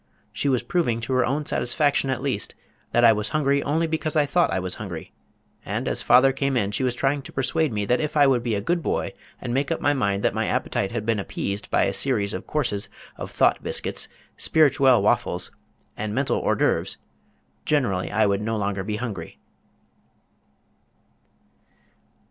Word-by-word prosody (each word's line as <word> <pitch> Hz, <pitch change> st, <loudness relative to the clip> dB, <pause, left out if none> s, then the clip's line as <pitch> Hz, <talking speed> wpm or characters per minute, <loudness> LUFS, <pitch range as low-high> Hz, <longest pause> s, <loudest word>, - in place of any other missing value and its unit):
She 140 Hz, -, 0 dB
was 130 Hz, -3 st, +1 dB
proving 140 Hz, -10 st, 0 dB
to 115 Hz, +3 st, -3 dB
her 130 Hz, 0 st, +3 dB
own 145 Hz, +4 st, -1 dB
satisfaction 140 Hz, +2 st, +1 dB
at 130 Hz, -1 st, -2 dB
least 130 Hz, -7 st, -2 dB, 0.4 s
that 120 Hz, 0 st, +4 dB
I 115 Hz, -, +8 dB
was 105 Hz, -1 st, -2 dB
hungry 140 Hz, -2 st, +1 dB
only 155 Hz, +4 st, 0 dB
because 160 Hz, 0 st, -2 dB
I 150 Hz, -2 st, +4 dB
thought 170 Hz, +4 st, +2 dB
I -, -, 0 dB
was 90 Hz, -1 st, -3 dB
hungry, 85 Hz, -6 st, -7 dB, 0.5 s
and -, -, -3 dB
as -, -, 0 dB
father 135 Hz, +2 st, +6 dB
came 135 Hz, 0 st, 0 dB
in 100 Hz, -3 st, 0 dB
she 105 Hz, -, -2 dB
was 125 Hz, -1 st, 0 dB
trying 140 Hz, +3 st, 0 dB
to 130 Hz, -, -11 dB
persuade 155 Hz, +3 st, 0 dB
me 105 Hz, -2 st, -1 dB
that 125 Hz, +4 st, +2 dB
if 150 Hz, 0 st, -2 dB
I 145 Hz, -, +7 dB
would 130 Hz, -3 st, +3 dB
be 115 Hz, -2 st, -1 dB
a 100 Hz, -, -1 dB
good 170 Hz, -, 0 dB
boy -, -, -2 dB, 0.3 s
and 120 Hz, -, -4 dB
make 135 Hz, +2 st, 0 dB
up 165 Hz, -, 0 dB
my 145 Hz, -, +2 dB
mind 100 Hz, -7 st, 0 dB
that -, -, +2 dB
my -, -, -1 dB
appetite 95 Hz, -, -1 dB
had 115 Hz, -2 st, -3 dB
been 115 Hz, -2 st, +1 dB
appeased 100 Hz, +1 st, -4 dB
by -, -, +3 dB
a -, -, 0 dB
series 105 Hz, -7 st, 0 dB
of -, -, -6 dB
courses 120 Hz, -9 st, -1 dB, 0.3 s
of -, -, -6 dB
thought -, -, +2 dB
biscuits, -, -, -2 dB, 0.3 s
spirituelle 135 Hz, -7 st, +4 dB
waffles, 105 Hz, -5 st, +1 dB, 0.4 s
and 110 Hz, 0 st, -4 dB
mental 135 Hz, 0 st, +1 dB
hors -, -, +1 dB
d'oeuvres -, -, +1 dB, 0.7 s
generally 110 Hz, -12 st, 0 dB
I 110 Hz, 0 st, +3 dB
would 100 Hz, 0 st, +1 dB
no 110 Hz, +1 st, -1 dB
longer 100 Hz, -2 st, -2 dB
be 105 Hz, +2 st, -3 dB
hungry. 100 Hz, -, -5 dB
125 Hz, 190 wpm, -24 LUFS, 105-140 Hz, 0.7 s, I